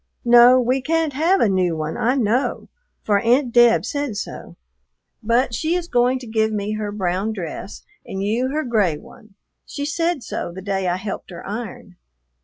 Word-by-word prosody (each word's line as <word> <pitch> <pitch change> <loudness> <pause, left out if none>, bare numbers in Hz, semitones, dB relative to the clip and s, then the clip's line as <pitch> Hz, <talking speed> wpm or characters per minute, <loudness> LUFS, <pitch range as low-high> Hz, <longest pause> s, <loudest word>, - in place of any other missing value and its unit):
"No, 240 +1 +7
we 255 +2 +1
can't 325 +1 0
have 335 +8 +2
a - - +4
new 180 -4 +1
one, 155 0 -3
I 250 +4 +1
know, 245 +1 0 0.3
for 205 -2 +2
Aunt 240 +3 +2
Deb 240 -1 +5
said 285 -7 -3
so, - - -7 0.7
but 235 +2 +1
she 320 +8 0
is 355 -1 -2
going 245 -2 +2
to 255 - -9
give 220 -1 0
me 210 0 -2
her 215 -1 -3
brown 195 +1 -2
dress 190 0 -7 0.2
and 195 0 -5
you 235 +6 0
her 305 +3 -1
gray 210 - +1
one; 215 +4 -17 0.3
she 285 - -5
said 330 -1 -1
so - - -5
the 180 - -9
day 195 -2 -1
I 175 - +1
helped 195 +2 -6
her 175 -2 -9
iron. 205 -3 -7
230 Hz, 185 wpm, -21 LUFS, 200-260 Hz, 0.7 s, No